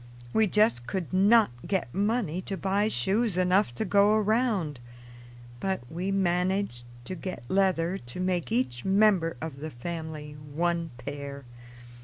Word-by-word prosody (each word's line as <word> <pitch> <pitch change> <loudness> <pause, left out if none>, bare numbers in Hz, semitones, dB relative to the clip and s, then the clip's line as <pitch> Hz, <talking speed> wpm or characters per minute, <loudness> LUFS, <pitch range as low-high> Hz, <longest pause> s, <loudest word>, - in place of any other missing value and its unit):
We 220 -1 +4
just 195 - +2
could 185 -3 -3
not 205 - +5 0.2
get 185 -11 -1
money 200 -4 0
to 195 - -2
buy 195 +2 +1
shoes 200 - 0
enough 185 - +2
to 170 - -2
go 205 +2 +4
around, 215 - +1 0.8
but 190 -1 -1
we 180 +4 -2
managed 180 -7 0 0.2
to 185 - -5
get 185 -4 -6
leather 190 -2 +1
to 120 +8 -9
make 180 -7 -1
each 125 0 0
member 190 -6 +3
of 160 -4 -5
the 155 +2 -5
family 155 +2 -6 0.2
one 170 0 0
pair. 140 0 -7
180 Hz, 140 wpm, -28 LUFS, 155-200 Hz, 0.8 s, not